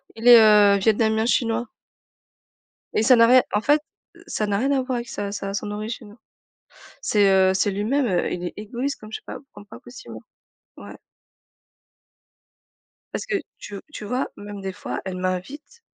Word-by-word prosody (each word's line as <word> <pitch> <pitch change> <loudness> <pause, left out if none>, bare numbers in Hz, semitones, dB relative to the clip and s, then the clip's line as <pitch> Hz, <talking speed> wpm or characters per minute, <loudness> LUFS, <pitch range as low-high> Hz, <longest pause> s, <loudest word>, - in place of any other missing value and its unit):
Il 225 +2 -3
est, 240 -1 +10
heu, 210 -2 +6
Vietnamien-Chinois. 225 +2 +1 1.3
Et 215 - +1
ça 255 +3 +6
n'a 230 -1 +6
rien 250 +1 +6
en 210 - +1
fait, 295 +5 +3 0.4
heu, - - -17
ça 215 - -2
n'a 200 -1 0
rien 270 +6 0
à 270 -2 +2
voir 255 -1 -3
avec 240 0 -5
sa 200 -1 -4
sa 195 -1 -5
son 205 +1 -4
origine. 215 0 -7 0.9
C'est, 205 -2 +3
heu, 190 0 +4
c'est 195 +2 +1
lui-même, 230 +8 0
heu, 180 -4 0
il 180 - -5
est - - -6
égoïste 240 +7 -4
comme 215 0 -13
je - - -2
sais - - -25
pas - - -7
p - - -20
comme 205 0 -14
pas - - -12
possible. 245 0 -12 0.6
Ouais. - - -11 2.2
Parce - - -4
que - - -2 0.2
tu 205 - -9
v 195 - -8
tu 225 - -8
vois 250 +5 -2
même 205 -1 -9
des 195 0 -4
fois 205 - -6
elle 185 -1 -5
m'invite 185 - -5
215 Hz, 185 wpm, -23 LUFS, 200-245 Hz, 2.2 s, est